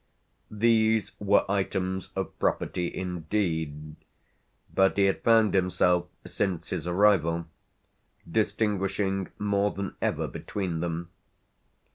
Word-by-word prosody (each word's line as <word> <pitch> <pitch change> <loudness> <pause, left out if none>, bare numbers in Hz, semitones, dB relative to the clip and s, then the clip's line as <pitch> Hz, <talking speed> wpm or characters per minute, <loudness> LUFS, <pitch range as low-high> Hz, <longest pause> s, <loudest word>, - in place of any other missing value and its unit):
These 110 0 +2
were 100 0 +3
items 95 -1 -1
of - - -4
property 90 -1 -1
indeed, 80 -4 -3 0.8
but 95 +1 +3
he 100 - +5
had 95 - +1
found 115 -3 +5
himself 90 -1 +2 0.2
since 95 -5 -2
his - - -3
arrival 85 -3 +3 0.8
distinguishing 100 -1 0
more 100 0 +1
than 100 -1 -5
ever - - 0
between 90 -5 -4
them. 85 0 -3
95 Hz, 100 wpm, -27 LUFS, 85-105 Hz, 0.8 s, he